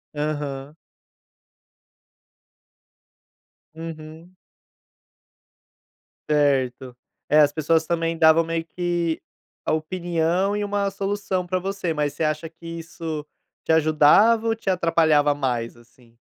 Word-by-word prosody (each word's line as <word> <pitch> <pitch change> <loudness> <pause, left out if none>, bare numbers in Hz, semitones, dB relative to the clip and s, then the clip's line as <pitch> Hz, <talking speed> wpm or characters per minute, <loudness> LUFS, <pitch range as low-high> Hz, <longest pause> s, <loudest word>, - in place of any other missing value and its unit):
Aham. 145 -1 -4 3.0
Uhum. 165 +2 -9 1.9
Certo. 130 -4 +1 0.3
É, 150 +1 +5
as 145 -1 +5
pessoas 160 +1 +1
também 165 -1 -1
davam 160 0 +5
meio 165 0 -3
que 175 -2 -2 0.4
a - - 0
opinião 175 +3 0
e 205 - -1
uma 200 -1 -1
solução 195 -2 -2
pra 185 +1 -1
você. 190 -3 -3
Mas 150 -1 -1
você 160 - -3
acha 155 +1 -1
que 165 +1 -18
isso 160 -2 -6 0.4
te - - 0
ajudava 160 +9 +5
ou 225 - +1
te 210 -3 -4
atrapalhava 160 -5 +3
mais, 120 -5 -2
assim? 120 0 -23
160 Hz, 105 wpm, -23 LUFS, 150-175 Hz, 3.0 s, É